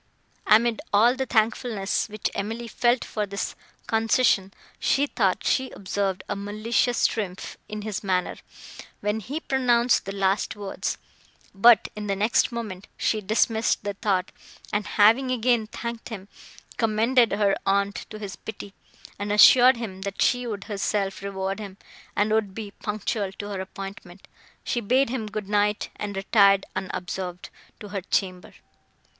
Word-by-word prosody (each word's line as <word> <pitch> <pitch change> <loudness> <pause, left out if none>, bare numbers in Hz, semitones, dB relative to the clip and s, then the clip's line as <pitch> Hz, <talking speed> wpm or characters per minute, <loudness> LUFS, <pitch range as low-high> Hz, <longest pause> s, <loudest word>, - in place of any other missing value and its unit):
Amid 225 +1 +4
all 225 +4 +5
the 265 0 -2
thankfulness, 220 -2 0
which 210 0 -3
Emily 225 +4 -4
felt 240 +2 +1
for 210 -2 -3
this 200 0 -3 0.3
concession, 225 -3 +2 0.3
she 280 - +2
thought 195 -9 0
she 260 -1 +1
observed 195 -1 -3
a - - -2
malicious 215 +4 0
triumph 195 -4 -2
in 215 0 -5
his 215 -1 -4
manner, 185 -2 0 0.6
when 210 +2 -1
he 265 +9 -5
pronounced 250 -4 +2
the 195 - -4
last 195 +1 0
words; 200 -2 -4 0.6
but, 220 +2 +6
in 210 0 -5
the 200 - 0
next 215 +5 +2
moment, 210 -5 -6
she 215 - 0
dismissed 220 +2 +1
the 205 - -2
thought, 195 -3 -1 0.4
and, 205 0 0
having 230 +5 +4
again 240 -2 +1
thanked 235 +1 -6
him, 200 -4 -7 0.5
commended 230 +2 +3
her 200 -1 +2
aunt 200 +1 0
to 215 - -8
his 205 -2 -6
pity, 205 -2 -9 0.5
and 205 0 -3
assured 245 +4 +8
him, 195 -5 -6
that 200 0 -5
she 245 -1 +2
would 205 -4 -4
herself 200 -1 -2
reward 195 0 -3
him, 200 -2 -8 0.4
and 210 +1 +1
would 215 -3 0
be 215 -3 -6
punctual 210 -1 -3
to 205 +1 -7
her 195 -2 -3
appointment, 195 -1 -9 0.4
she 240 - -1
bade 250 +3 +2
him 235 -4 -3
good 210 -1 -5
night, 210 0 +1
and 205 -1 -5
retired, 195 0 +4
unobserved, 180 -1 -5 0.3
to 210 - -9
her 200 -1 -3
chamber. 185 -1 -2
210 Hz, 150 wpm, -25 LUFS, 195-230 Hz, 0.6 s, assured